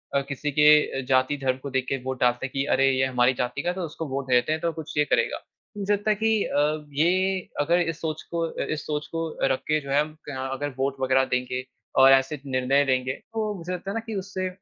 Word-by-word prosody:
अ, 140 Hz, -, +3 dB
किसी 145 Hz, +2 st, -3 dB
के 150 Hz, -1 st, +5 dB
जाति, 130 Hz, +2 st, +2 dB
धर्म 130 Hz, -1 st, 0 dB
को 140 Hz, -, -4 dB
देख 130 Hz, -1 st, -1 dB
के 135 Hz, -, 0 dB
वोट 130 Hz, -1 st, -4 dB
डालते 125 Hz, +1 st, +2 dB
हैं 135 Hz, -, -6 dB
कि 135 Hz, 0 st, 0 dB
अरे 135 Hz, +1 st, +4 dB
ये 130 Hz, 0 st, +2 dB
हमारी 125 Hz, 0 st, +3 dB
जाति 125 Hz, +2 st, -2 dB
का 175 Hz, -, -1 dB
है, 180 Hz, -, -2 dB
तो 190 Hz, -, -4 dB
उसको 160 Hz, +1 st, -6 dB
वोट 135 Hz, 0 st, -4 dB
देते 125 Hz, +3 st, +3 dB
हैं 155 Hz, 0 st, -1 dB
तो 170 Hz, -, 0 dB
कुछ 160 Hz, -2 st, -8 dB
ये 150 Hz, -, +4 dB
करेगा। -, -, +1 dB, 0.4 s
मुझे 205 Hz, 0 st, 0 dB
लगता 205 Hz, +1 st, -1 dB
है 210 Hz, -, +2 dB
कि 220 Hz, 0 st, +1 dB
अ, 150 Hz, +1 st, 0 dB
ये 185 Hz, +5 st, +2 dB, 0.2 s
अगर 170 Hz, +4 st, +3 dB
इस 165 Hz, -2 st, -2 dB
सोच 155 Hz, -1 st, -3 dB
को 170 Hz, -, -1 dB
अ, -, -, -5 dB
इस 155 Hz, -, -4 dB
सोच 150 Hz, -1 st, -3 dB
को 165 Hz, 0 st, -1 dB, 0.2 s
रख 130 Hz, -, 0 dB
के 155 Hz, 0 st, +2 dB
जो 140 Hz, -, -10 dB
है 145 Hz, +1 st, +4 dB
हम 155 Hz, +1 st, -5 dB
क 130 Hz, -1 st, -4 dB
अगर 145 Hz, +1 st, -3 dB
वोट 135 Hz, +1 st, 0 dB
वगैरह 130 Hz, 0 st, +3 dB
देंगे 125 Hz, 0 st, -2 dB, 0.3 s
और 135 Hz, 0 st, +8 dB
ऐसे 135 Hz, +2 st, +3 dB
निर्णय 135 Hz, +2 st, +2 dB
देंगे, 130 Hz, -1 st, +1 dB
तो 220 Hz, +3 st, -4 dB
मुझे 175 Hz, +1 st, -6 dB
लगता 180 Hz, +2 st, -5 dB
है 205 Hz, -, -5 dB
ना -, -, 0 dB
कि 225 Hz, -2 st, -5 dB
उससे 190 Hz, -1 st, -3 dB
145 Hz, 255 wpm, -25 LUFS, 130-165 Hz, 0.4 s, और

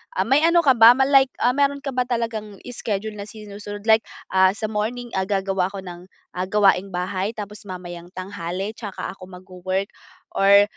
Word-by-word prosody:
Ah, 190 Hz, -, +2 dB
may 270 Hz, +7 st, +3 dB
ano 340 Hz, 0 st, +4 dB
ka 280 Hz, -, +6 dB
ba, 235 Hz, -1 st, +8 dB
ma 265 Hz, -, +3 dB
like, 270 Hz, -1 st, +5 dB
ah, 245 Hz, -, +5 dB
meron 280 Hz, +1 st, 0 dB
ka 275 Hz, -, -3 dB
ba 250 Hz, -1 st, -1 dB
talagang 225 Hz, -4 st, -3 dB, 0.2 s
schedule 215 Hz, -3 st, -3 dB
na 200 Hz, -, -6 dB
sinusunod? 205 Hz, -1 st, -9 dB
Like, 220 Hz, 0 st, +4 dB, 0.2 s
ah, 190 Hz, 0 st, +4 dB
sa 215 Hz, 0 st, -4 dB
morning, 235 Hz, +3 st, -3 dB
ah, 190 Hz, -, -2 dB
gagawa 195 Hz, -2 st, 0 dB
ako 195 Hz, 0 st, -8 dB
ng, 180 Hz, 0 st, -10 dB, 0.2 s
ah, 180 Hz, +1 st, -3 dB
gawaing-bahay, 195 Hz, 0 st, +1 dB
tapos 210 Hz, -1 st, -8 dB
mamayang 175 Hz, -2 st, -8 dB
tanghali 185 Hz, +1 st, -4 dB
tsaka 215 Hz, -3 st, -6 dB
ako 185 Hz, -1 st, -12 dB
magwo-work 185 Hz, +1 st, -4 dB, 0.4 s
or, 200 Hz, +1 st, +6 dB
205 Hz, 180 wpm, -22 LUFS, 190-230 Hz, 0.4 s, ba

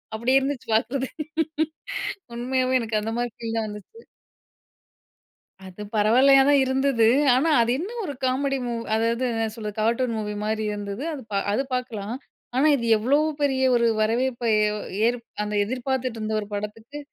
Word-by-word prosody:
அப்படி 235 Hz, +4 st, 0 dB
இருந்துச்சு, 270 Hz, -2 st, -3 dB
பார்க்குறது. 250 Hz, +4 st, 0 dB, 1.3 s
உண்மையாவே 255 Hz, +1 st, +1 dB
எனக்கு 220 Hz, -2 st, -1 dB
அந்த 225 Hz, +1 st, -3 dB
மாரி 240 Hz, -1 st, -2 dB
ஃபீல் 230 Hz, -1 st, -4 dB
தான் 220 Hz, -1 st, -2 dB
வந்துச்சு. 210 Hz, -, -11 dB, 1.7 s
அது 185 Hz, +3 st, -11 dB
பரவாயில்லையா 255 Hz, +6 st, +6 dB
தான் 285 Hz, -1 st, +5 dB
இருந்தது. 260 Hz, -3 st, +2 dB, 0.3 s
ஆனா, 305 Hz, +6 st, +2 dB
அது 235 Hz, +1 st, +2 dB
என்ன 365 Hz, +6 st, -4 dB, 0.2 s
ஒரு 290 Hz, -, -4 dB
காமெடி 270 Hz, +2 st, +1 dB
மூவி 235 Hz, -1 st, -3 dB
அதாவது 230 Hz, +2 st, 0 dB
என்ன 225 Hz, 0 st, 0 dB
சொல்றது? 210 Hz, -2 st, -6 dB
கார்ட்டூன் 235 Hz, +1 st, +1 dB
மூவி 210 Hz, -1 st, -3 dB
மாரி 220 Hz, 0 st, -1 dB
இருந்தது. 205 Hz, +4 st, -5 dB
அது 280 Hz, -, -6 dB
பா 200 Hz, -, 0 dB
அது 240 Hz, +7 st, +1 dB
பார்க்கலாம். 235 Hz, -3 st, -3 dB, 0.4 s
ஆனா, 275 Hz, +4 st, +4 dB
இது 235 Hz, -, -4 dB
எவ்வளோ 255 Hz, +7 st, +2 dB, 0.2 s
பெரிய 270 Hz, -2 st, +1 dB
ஒரு 235 Hz, -1 st, +3 dB, 0.2 s
வரவேற்பை 235 Hz, +1 st, 0 dB
ஏ 210 Hz, -, +3 dB, 0.4 s
ஏற்ப் 240 Hz, -1 st, -2 dB, 0.2 s
அந்த 210 Hz, 0 st, -4 dB
எதிர்பார்த்துட்டு 255 Hz, 0 st, -2 dB
இருந்த 215 Hz, 0 st, -2 dB
ஒரு 205 Hz, -, -7 dB
படத்துக்கு, 220 Hz, +7 st, -6 dB
235 Hz, 155 wpm, -24 LUFS, 220-260 Hz, 1.7 s, பரவாயில்லையா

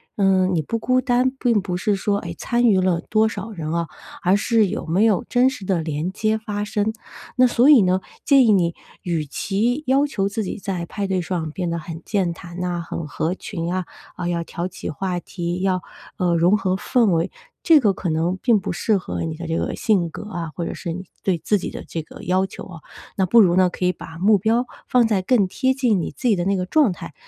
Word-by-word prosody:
呃， 190 Hz, -2 st, +3 dB
你 175 Hz, -4 st, +1 dB
不 230 Hz, +10 st, -3 dB
孤 255 Hz, +3 st, +2 dB
单， 255 Hz, 0 st, +2 dB
并 235 Hz, -5 st, +2 dB
不 180 Hz, -2 st, -3 dB
是 205 Hz, +2 st, +1 dB
说， 200 Hz, +1 st, 0 dB
哎， -, -, -5 dB
参 240 Hz, 0 st, 0 dB
与 195 Hz, -5 st, +4 dB
了 180 Hz, -2 st, +1 dB
多 220 Hz, 0 st, +3 dB
少 215 Hz, +1 st, -6 dB
人 160 Hz, -6 st, -5 dB
啊， 170 Hz, -1 st, -1 dB, 0.4 s
而 185 Hz, +2 st, +4 dB
是 220 Hz, 0 st, +2 dB
有 170 Hz, -, -4 dB
没 190 Hz, +7 st, +3 dB
有 210 Hz, -5 st, +2 dB
真 250 Hz, +1 st, +4 dB
实 265 Hz, -, -8 dB
的 190 Hz, -2 st, 0 dB
连 155 Hz, +3 st, -2 dB
接 215 Hz, +2 st, 0 dB
发 205 Hz, -1 st, -4 dB
生。 210 Hz, +1 st, -1 dB, 0.4 s
那 255 Hz, 0 st, +5 dB
所 245 Hz, +3 st, +4 dB
以 255 Hz, -9 st, +8 dB
呢， 185 Hz, +1 st, +2 dB, 0.2 s
建 270 Hz, -4 st, +6 dB
议 -, -, +6 dB
你 175 Hz, -4 st, +2 dB, 0.3 s
与 165 Hz, -3 st, -1 dB
其 230 Hz, -, -1 dB
要 275 Hz, +3 st, +3 dB
求 195 Hz, -7 st, -1 dB
自 210 Hz, +2 st, -2 dB
己 185 Hz, -, -4 dB
在 185 Hz, -4 st, -4 dB
派 200 Hz, -1 st, -3 dB
对 190 Hz, -2 st, 0 dB
上 165 Hz, -3 st, -3 dB
变 175 Hz, +1 st, -3 dB
得 170 Hz, -, -2 dB
很 165 Hz, 0 st, -7 dB
健 190 Hz, -5 st, 0 dB
谈 175 Hz, +1 st, -10 dB
呐， 175 Hz, -1 st, -2 dB
很 165 Hz, -1 st, -5 dB
合 165 Hz, +5 st, -2 dB
群 175 Hz, -4 st, -5 dB
啊， 185 Hz, -1 st, -1 dB, 0.3 s
啊， 175 Hz, -, -4 dB
要 170 Hz, -1 st, -1 dB
挑 170 Hz, +1 st, -4 dB
起 185 Hz, -, -7 dB
话 180 Hz, +2 st, -2 dB
题， 175 Hz, +1 st, -4 dB
要， 185 Hz, -2 st, 0 dB, 0.3 s
呃， 175 Hz, -2 st, +1 dB
融 175 Hz, +5 st, +4 dB
合 185 Hz, -2 st, 0 dB
氛 220 Hz, +1 st, +2 dB
围， 165 Hz, 0 st, +1 dB, 0.3 s
这 325 Hz, -3 st, +7 dB
个 210 Hz, -, +4 dB
可 180 Hz, -2 st, -3 dB
能 165 Hz, +4 st, 0 dB
并 230 Hz, -5 st, +4 dB
不 -, -, -3 dB
适 205 Hz, +4 st, +1 dB
合 180 Hz, -, -4 dB
你 160 Hz, -1 st, -3 dB
的 170 Hz, +1 st, -7 dB
这 165 Hz, -, -1 dB
个 -, -, -2 dB
性 190 Hz, -7 st, +1 dB
格 -, -, -8 dB
啊， 170 Hz, -5 st, -5 dB
或 170 Hz, -, -3 dB
者 -, -, -4 dB
是 170 Hz, -3 st, -5 dB
你 185 Hz, -, -6 dB, 0.2 s
对 185 Hz, -3 st, +1 dB
自 205 Hz, +6 st, +1 dB
己 -, -, -4 dB
的 -, -, -8 dB
这 165 Hz, -, -4 dB
个 155 Hz, -, -13 dB
要 185 Hz, +1 st, +1 dB
求 190 Hz, -, -9 dB
哦。 165 Hz, -4 st, -11 dB, 0.4 s
那 190 Hz, -, +3 dB
不 230 Hz, +6 st, +6 dB
如 175 Hz, -3 st, +4 dB
呢， 185 Hz, -1 st, +5 dB
可 180 Hz, -, -6 dB
以 180 Hz, -, +4 dB
把 165 Hz, -2 st, -10 dB
目 205 Hz, +2 st, +5 dB
标 230 Hz, +5 st, +1 dB, 0.2 s
放 245 Hz, -2 st, +4 dB
在 200 Hz, -4 st, +1 dB
更 205 Hz, -1 st, +2 dB
贴 260 Hz, +4 st, +1 dB
近 245 Hz, -8 st, +1 dB
你 -, -, -4 dB
自 255 Hz, -, -3 dB
己 210 Hz, -, +4 dB
的 175 Hz, -, -1 dB
那 195 Hz, 0 st, +2 dB
个 180 Hz, -, -1 dB
状 280 Hz, +2 st, +3 dB
态。 165 Hz, -, -9 dB
190 Hz, 260 characters per minute, -22 LUFS, 175-220 Hz, 0.4 s, 以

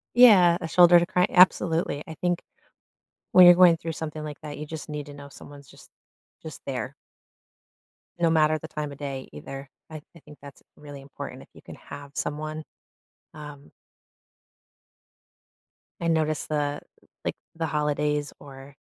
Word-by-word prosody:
Yeah, 200 Hz, -9 st, +7 dB
a 165 Hz, -, -5 dB
shoulder 175 Hz, +1 st, +6 dB
to 170 Hz, -, 0 dB
cry 180 Hz, +1 st, +1 dB
absolutely, 170 Hz, -4 st, +3 dB
I 160 Hz, -, -8 dB
think 175 Hz, +2 st, -2 dB, 0.9 s
when 185 Hz, -, +8 dB
you're 175 Hz, -, +9 dB
going 175 Hz, -2 st, +6 dB
through 165 Hz, 0 st, -6 dB
something 155 Hz, -1 st, -6 dB
like 150 Hz, -1 st, -8 dB
that, 150 Hz, -1 st, -8 dB
you 150 Hz, -, -6 dB
just 160 Hz, +1 st, -8 dB
need 150 Hz, -1 st, -6 dB
to 145 Hz, -, -11 dB
know 140 Hz, 0 st, -11 dB
someone's 140 Hz, 0 st, -14 dB
just -, -, -17 dB, 0.5 s
just -, -, -9 dB
there. -, -, -4 dB, 1.3 s
No 170 Hz, -1 st, +2 dB
matter 155 Hz, -1 st, +2 dB
the 160 Hz, -, -10 dB
time 150 Hz, -2 st, -5 dB
of 140 Hz, -, -12 dB
day, 135 Hz, -2 st, -6 dB
either. 135 Hz, -, -9 dB, 0.2 s
I 155 Hz, -1 st, -9 dB
I -, -, -14 dB
think 150 Hz, -1 st, -16 dB
that's 140 Hz, -1 st, -13 dB
really 145 Hz, -1 st, -11 dB
important 135 Hz, +1 st, -9 dB
if -, -, -18 dB
you -, -, -16 dB
can -, -, -12 dB
have 145 Hz, 0 st, -11 dB
someone, 155 Hz, +2 st, -4 dB, 0.7 s
um 150 Hz, -2 st, -11 dB, 2.3 s
I 170 Hz, -, -2 dB
noticed 155 Hz, -2 st, 0 dB
the 145 Hz, -1 st, -2 dB, 0.4 s
like, -, -, -2 dB, 0.2 s
the 165 Hz, 0 st, -2 dB
holidays 150 Hz, -1 st, -1 dB
or 135 Hz, 0 st, -13 dB
150 Hz, 160 wpm, -25 LUFS, 145-165 Hz, 2.3 s, you're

